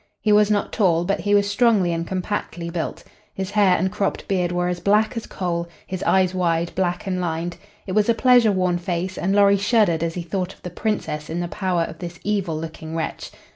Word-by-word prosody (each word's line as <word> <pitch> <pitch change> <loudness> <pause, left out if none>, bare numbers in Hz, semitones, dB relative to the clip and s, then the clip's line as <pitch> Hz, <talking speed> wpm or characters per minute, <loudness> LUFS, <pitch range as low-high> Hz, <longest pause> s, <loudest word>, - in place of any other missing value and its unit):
He 215 - +1
was 210 0 +5
not 205 -1 0
tall, 175 -5 +2
but 195 +2 0
he 205 0 +2
was 200 0 +3
strongly 205 -5 +3
and 165 0 -3
compactly 185 -2 -3
built. 170 -1 -4 0.3
His 190 0 -4
hair 200 -4 +4
and 190 +2 0
cropped 200 - -2
beard 180 -3 0
were 175 0 0
as 180 0 -2
black 210 +6 +2
as 230 - -5
coal, 170 -2 -3 0.2
his 185 0 -5
eyes 185 -1 +2
wide, 170 -2 0
black 180 -1 -1
and 185 -2 -1
lined, 170 0 -3 0.3
It 190 - -5
was 210 +3 +2
a 230 - +4
pleasure 245 -3 +5
worn 180 -2 +1
face, 180 +1 -3
and 195 +3 0
Lorry 200 0 +5
shuddered 205 -5 +2
as 165 0 -2
he 175 - -3
thought 185 +2 -3
of - - -29
the 180 - -6
Princess 175 -7 -3
in 165 +2 -3
the 175 - -2
power 180 -2 -1
of 165 0 -7
this 175 -1 -7
evil 195 -6 -1
looking 160 0 -7
wretch. 160 - -4
185 Hz, 220 wpm, -22 LUFS, 170-205 Hz, 0.3 s, was